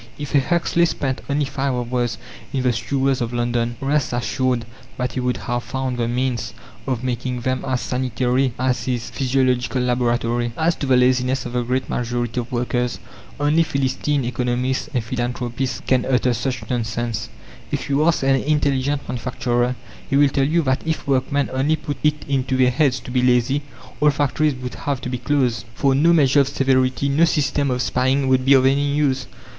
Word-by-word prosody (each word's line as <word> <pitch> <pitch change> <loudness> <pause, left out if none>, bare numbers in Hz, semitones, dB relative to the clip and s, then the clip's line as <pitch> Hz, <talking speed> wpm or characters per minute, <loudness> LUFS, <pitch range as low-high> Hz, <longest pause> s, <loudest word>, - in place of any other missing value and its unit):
If 145 -2 -6
a 145 - +6
Huxley 170 +3 +2
spent 135 -4 -2
only 145 +1 +1
five 135 -1 -2
hours 120 -1 -1 0.3
in 130 -2 -1
the 125 -1 +2
sewers 130 +3 0
of 120 0 -2
London, 120 0 0
rest 140 -1 0
assured 120 +1 0 0.3
that 125 0 -1
he - - -3
would 125 0 0
have 120 0 -2
found 130 -2 -3
the 115 - +1
means 125 -1 -2 0.3
of 130 -2 -2
making 125 0 -2
them 130 +1 -1
as 130 -1 -1
sanitary 125 +1 0
as 125 -3 0
his 125 -2 -2
physiological 130 -1 +1
laboratory. 120 -1 0
As 165 +2 +2
to 140 - -3
the 130 -1 +4
laziness 125 +1 +2
of - - -6
the 125 - +1
great 125 +2 -1
majority 120 0 -2
of 120 +2 -6
workers, 125 0 -1 0.4
only 150 +3 +3
philistine 140 -2 0
economists 125 +3 -1
and 125 -5 -1
philanthropists 120 +1 -3
can 130 -2 +2
utter 125 -1 +2
such 125 +2 -3
nonsense. 115 -1 -2 0.4
If - - -3
you 140 +2 +2
ask 165 -3 +2
an 135 0 +4
intelligent 145 -1 0
manufacturer, 125 0 -1 0.3
he 135 - +1
will 145 0 +5
tell 135 0 +1
you 165 +2 +2
that 130 -1 +1
if 160 0 -2
workmen 140 +1 +1
only 140 +4 +2
put 150 -1 -5
it 150 0 +1
into 130 -1 0
their 130 -1 +4
heads 130 -1 +2
to - - -9
be 125 0 +2
lazy, 125 +3 +2 0.4
all 150 - +5
factories 145 0 +1
would 125 -1 -6
have 140 -2 -3
to - - -4
be 125 -1 -3
closed, 125 -5 0
for 135 -1 +2
no 155 +5 +4
measure 145 -4 +4
of 140 - +4
severity, 135 -1 +1
no 145 +4 +4
system 145 -3 +1
of 125 -1 0
spying 130 +2 +1
would 130 -1 +3
be 140 +1 +7
of 130 -1 +4
any 140 +1 +2
use. 135 -4 +1
130 Hz, 185 wpm, -21 LUFS, 125-140 Hz, 0.4 s, be